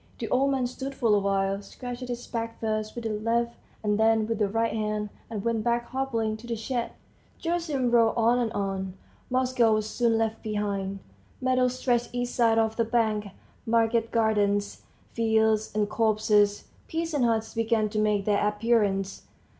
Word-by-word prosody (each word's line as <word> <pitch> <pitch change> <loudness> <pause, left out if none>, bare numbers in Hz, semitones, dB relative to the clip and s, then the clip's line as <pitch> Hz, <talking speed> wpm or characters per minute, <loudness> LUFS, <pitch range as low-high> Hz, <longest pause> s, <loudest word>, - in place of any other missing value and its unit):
The - - -4
old 270 +2 +3
man 265 -2 +1
stood 265 +2 -5
for 230 -5 +2
a 205 - +5
while, 195 0 0
scratched 245 +4 -7
his 245 0 -5
back 230 -1 -4
first 215 -1 -2
with 235 - -5
the 225 - -2
left 230 +2 0 0.3
and 210 0 +1
then 220 0 +4
with 225 0 -2
the 210 - +3
right 225 +2 0
hand, 210 -1 -2 0.2
and 215 -3 -4
went 230 -2 0
back 235 +1 +1
hobbling 230 -5 -1
to 230 +2 -12
the 235 - -2
shed. 235 +2 -3 0.5
Gerasim 325 -7 -1
rowed 230 -2 +4
on 235 +2 +3
and 235 -2 0
on. 190 -2 -3 0.3
Moscow 250 -3 +3
was 215 0 -1
soon 230 0 +1
left 225 0 -1
behind. 200 -2 -2 0.4
Meadows 255 -1 +1
stretched 245 -2 +1
each 245 0 -1
side 230 -2 +3
of 220 0 +1
the 230 - +3
bank, 220 -3 0 0.4
market 230 0 +2
gardens, 205 -3 +1 0.3
fields, 220 -1 +2
and 210 -1 +2
copses; 210 -1 +2 0.3
peasants' 320 -6 0
huts 225 -1 -1
began 225 -1 +1
to 215 0 -2
make 210 -2 +1
their 205 -1 +2
appearance. 210 -3 0
225 Hz, 170 wpm, -27 LUFS, 210-240 Hz, 0.5 s, a